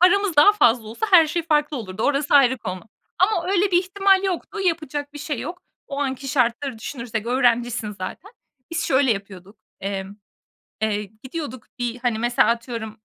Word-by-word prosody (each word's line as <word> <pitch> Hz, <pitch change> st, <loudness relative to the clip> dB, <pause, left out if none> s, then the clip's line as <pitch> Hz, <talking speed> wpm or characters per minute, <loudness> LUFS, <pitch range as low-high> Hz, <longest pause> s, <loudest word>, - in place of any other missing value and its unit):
paramız 370 Hz, -1 st, +4 dB
daha 410 Hz, +8 st, +8 dB
fazla 235 Hz, -, +3 dB
olsa 235 Hz, -, -3 dB
her 335 Hz, -4 st, +8 dB
şey 335 Hz, +3 st, -2 dB
farklı 300 Hz, -2 st, +1 dB
olurdu 210 Hz, -3 st, -5 dB
orası 285 Hz, 0 st, +1 dB
ayrı 260 Hz, -3 st, +5 dB
konu. 185 Hz, -4 st, -5 dB, 0.4 s
Ama 370 Hz, -2 st, +2 dB
öyle 395 Hz, 0 st, +2 dB
bir 350 Hz, -, +5 dB
ihtimal 390 Hz, +1 st, +3 dB
yoktu. 385 Hz, +2 st, -3 dB
Yapacak 300 Hz, -5 st, -2 dB
bir 295 Hz, -, -9 dB
şey 290 Hz, -3 st, -4 dB
yok. 355 Hz, +4 st, -7 dB, 0.2 s
O 280 Hz, -, -5 dB
anki 270 Hz, -1 st, -3 dB
şartları 250 Hz, -1 st, 0 dB
düşünürsek 235 Hz, -2 st, -5 dB
öğrencisin 240 Hz, -3 st, +1 dB
zaten. 205 Hz, -, -7 dB, 0.4 s
Biz 335 Hz, -1 st, -2 dB
şöyle 260 Hz, -2 st, +3 dB
yapıyorduk. 195 Hz, 0 st, -9 dB, 0.2 s
Emm, 195 Hz, 0 st, -4 dB, 0.7 s
eee, 210 Hz, -1 st, 0 dB, 0.2 s
gidiyorduk 260 Hz, -4 st, -6 dB
bir, 245 Hz, 0 st, -3 dB
hani, 240 Hz, -3 st, -1 dB
mesela 240 Hz, +1 st, +3 dB
atıyorum 230 Hz, -2 st, -3 dB
260 Hz, 165 wpm, -22 LUFS, 225-330 Hz, 0.7 s, daha